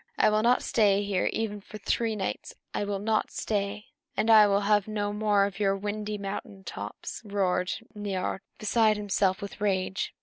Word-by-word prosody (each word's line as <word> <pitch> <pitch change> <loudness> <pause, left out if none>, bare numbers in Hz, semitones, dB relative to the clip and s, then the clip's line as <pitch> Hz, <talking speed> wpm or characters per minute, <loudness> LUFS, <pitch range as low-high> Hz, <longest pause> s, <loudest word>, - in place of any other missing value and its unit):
I - - +4
will 215 0 +3
not 240 +3 +3
stay 205 -3 +3
here 200 -2 0
even 210 -2 -3
for 215 - -10
three 225 +1 0
nights! 195 -3 -4 0.2
I 205 - -1
will 200 -1 -2
not 215 +2 0
stay!" 205 0 -2 0.3
"And 225 - +3
I 215 -1 +9
will 200 0 +2
have 205 0 +2
no 205 -1 -2
more 210 -1 +3
of 200 -1 -5
your 195 -1 +2
windy 210 +1 -3
mountain 195 0 -6
tops," - - -7
roared 190 -3 0 0.2
Niörd, 195 -2 -2 0.2
beside 215 0 +3
himself 200 -1 0
with 200 +1 -8
rage. 190 -1 -1
205 Hz, 175 wpm, -28 LUFS, 195-215 Hz, 0.3 s, I